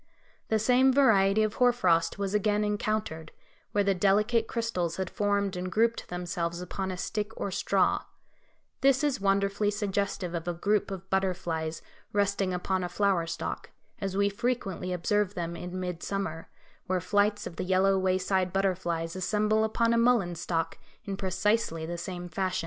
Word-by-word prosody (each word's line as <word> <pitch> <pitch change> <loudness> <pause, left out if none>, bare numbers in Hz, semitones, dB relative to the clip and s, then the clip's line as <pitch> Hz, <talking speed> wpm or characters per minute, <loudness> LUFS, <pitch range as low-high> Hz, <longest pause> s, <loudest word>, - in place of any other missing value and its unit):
The 220 - +2
same 250 +4 +4
variety 215 -6 +4
of 215 -1 0
hoar 245 0 +7
frost 170 -8 +2
was 200 -1 -2
again 210 0 +2
encountered, 210 -6 -2 0.4
where 205 - +2
the 200 0 +3
delicate 210 +5 +2
crystals 185 -8 -2
had 190 -1 -3
formed 200 -1 0
and 180 0 -4
grouped 230 +3 +1
themselves 175 -1 -3
upon 190 +2 -4
a 185 - -4
stick 210 +4 -3
or 200 - -2
straw; - - +1 0.8
this 275 +1 +4
is 285 -8 0
wonderfully 200 +1 +2
suggestive 200 -3 -2
of 170 0 -4
a 175 - -1
group 205 +3 +1
of 190 -1 -7
butterflies 175 -4 -1 0.3
resting 200 -2 +1
upon 185 +1 -1
a 175 - -3
flower 190 -3 +1
stalk, 170 0 -4 0.3
as 195 -1 -3
we 200 0 +3
frequently 200 -4 -2
observe 200 +3 0
them 170 -1 -3
in 180 +2 -5
mid 180 -2 -4
summer, 195 -5 -4 0.4
where 185 0 +1
flights 205 +3 +1
of 165 - -7
the - - -2
yellow 190 +1 +3
wayside 185 0 +1
butterflies 175 -3 -1
assemble 210 +3 +1
upon 230 +1 +2
a 230 - +3
mullein 230 -7 +3
stalk 165 -1 -2 0.3
in 195 - -3
precisely 190 -3 0
the 170 +1 -4
same 175 +1 -5
fashion. 185 +2 -1
195 Hz, 165 wpm, -28 LUFS, 180-210 Hz, 0.8 s, hoar